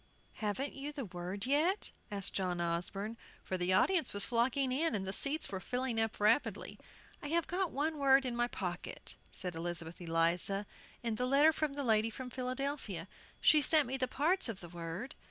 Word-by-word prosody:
"Haven't 220 +6 -2
you 280 +2 -5
the 285 -4 -5
word 185 +3 -4
yet?" 310 +9 +2 0.2
asked 200 -2 -2
John 180 -2 -1
Osborne, 180 +6 -1 0.3
for 185 - -3
the 180 0 0
audience 330 - +3
was 200 0 -2
flocking 255 +3 +2
in, 305 +1 +2
and 195 -2 -2
the 190 - -3
seats 285 +3 +1
were 190 - -3
filling 250 +2 -1
up 225 0 -2
rapidly. 215 +7 +1 0.4
"I - - -5
have 335 +2 +1
got 365 0 -1
one 305 +2 -1
word 270 -1 +5
in 245 -2 -2
my 240 0 +1
pocket," 180 -6 -3 0.2
said 180 -2 -4
Elizabeth 170 0 -4
Eliza, 170 +4 +1 0.4
"in 230 -2 -1
the 250 - 0
letter 290 +4 +5
from 305 -3 -1
the 285 0 -3
lady 220 -2 +3
from 250 +2 -7
Philadelphia. 255 - -3 0.3
She 305 - +6
sent 305 0 +5
me 260 +2 -2
the 260 -1 0
parts 315 +4 +2
of 210 -4 -4
the 175 - -9
word. 170 +8 -6
235 Hz, 190 wpm, -34 LUFS, 190-280 Hz, 0.4 s, She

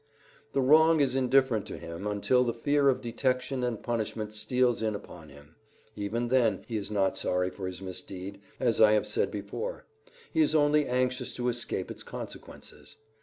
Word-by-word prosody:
The 135 - +2
wrong 160 +4 +6
is 135 -3 +2
indifferent 130 -4 +2
to - - -6
him 85 +4 -6
until 105 +5 +2
the 120 -2 -1
fear 145 +3 +3
of 130 - +1
detection 125 +2 -1
and 120 -3 -2
punishment 110 -2 -3
steals 120 +2 +1
in 110 -1 0
upon 85 -6 -10
him. 70 +3 -17 0.4
Even 115 +4 -2
then 120 -6 +2
he 115 - -4
is 105 -2 -3
not 100 -3 +1
sorry 90 -1 0
for 95 -1 -6
his 95 +1 -7
misdeed, 95 +1 -7 0.2
as 120 -4 +2
I 110 -1 +7
have 105 - +2
said 445 +3 0
before; - - -5 0.5
he 320 - +3
is 305 - +3
only 150 -1 +4
anxious 125 0 -1
to 125 0 0
escape 115 -6 -3
its - - -8
consequences. - - -9
120 Hz, 175 wpm, -29 LUFS, 100-130 Hz, 0.5 s, I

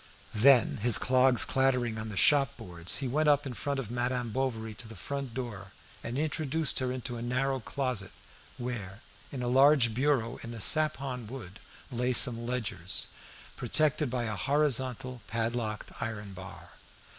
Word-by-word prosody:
Then, 120 +1 +5
his 115 +2 +5
clogs 130 -3 +4
clattering 125 -4 +1
on 110 0 -5
the 105 - -6
shop 140 0 +4
boards, 85 -1 -3
he - - -1
went 150 +4 +2
up 145 0 +3
in 130 - -5
front 140 +4 -3
of 120 -4 -5
Madame 120 -1 -1
Bovary 115 -3 -2
to 115 +1 -4
the 115 - -10
first 140 -4 -5
door, 105 -7 -6 0.3
and 120 +2 -4
introduced 155 0 +1
her 130 -1 -1
into 125 -1 -4
a - - -6
narrow 130 +3 -1
closet, 125 -5 -3 0.5
where, 110 -5 -6 0.3
in 130 -3 -5
a - - -2
large 135 -2 +5
bureau 130 -1 0
in 115 0 -7
sapon 135 -3 +1
wood, 105 -6 -9 0.3
lay 125 +1 0
some 120 -1 +3
ledgers, 110 -8 -2 0.5
protected 155 -2 +3
by 125 -1 -2
a 110 -2 -3
horizontal 130 -2 0
padlocked 115 -1 -3
iron 105 -3 -5
bar. 95 0 -11
125 Hz, 155 wpm, -29 LUFS, 110-135 Hz, 0.5 s, Then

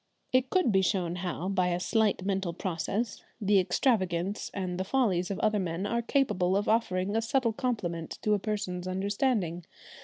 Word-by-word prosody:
It 255 0 +3
could 365 -11 +3
be 190 -1 +4
shown 180 -2 0
how, 180 -1 -3
by 185 -2 +1
a 175 0 0
slight 210 -1 +1
mental 195 -3 -1
process, 190 +6 -2 0.2
the 205 -2 +4
extravagances 185 -1 0
and 185 -2 -3
the - - +1
follies 190 -6 +1
of 200 - -2
other 215 -1 +2
men 175 0 -2
are 235 +3 0
capable 195 -8 +1
of 205 - -1
offering 200 -3 +1
a 225 - +2
subtle 235 0 +1
compliment 175 -10 -3
to 210 - +3
a 205 - +2
person's 195 -4 -3
understanding. 190 -2 0
195 Hz, 175 wpm, -29 LUFS, 180-220 Hz, 0.2 s, be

